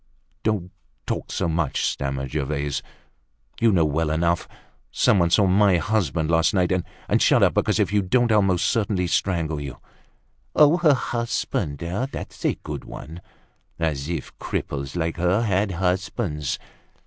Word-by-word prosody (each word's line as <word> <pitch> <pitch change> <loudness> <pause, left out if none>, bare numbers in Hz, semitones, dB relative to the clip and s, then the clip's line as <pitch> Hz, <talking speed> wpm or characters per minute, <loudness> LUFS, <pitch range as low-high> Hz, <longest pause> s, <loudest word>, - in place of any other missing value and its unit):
"Don't 100 -5 -1 0.3
talk - - -3
so - - -1
much," 80 -4 0
stammered 70 -1 -2
Gervaise. 70 -1 -2 0.8
"You 115 -1 +4
know 85 -5 +3
well 75 +1 0
enough. 85 +2 +1 0.4
Some 100 - +3
one 85 -1 +3
saw 100 +4 +4
my 95 0 +4
husband 85 -5 0
last 80 +5 +3
night. 90 -1 +2 0.4
And - - +2
shut - - +5
up, - - +4
because - - +1
if - - +1
you 105 - +4
don't 120 +5 +2
I'll 105 -1 +5
most 95 -3 +1
certainly 100 -5 +1
strangle 80 -4 0
you." 65 -4 -6 0.8
"Her 155 0 +5
husband! 115 - -2
That's 95 - -5
a - - +2
good - - -5
one! 80 +5 -9 0.6
As 75 -3 -2
if 85 - -5
cripples 70 0 -4
like 80 -1 -1
her 90 +6 +2
had 100 -2 +1
husbands! 90 - -1
90 Hz, 150 wpm, -23 LUFS, 80-105 Hz, 0.8 s, shut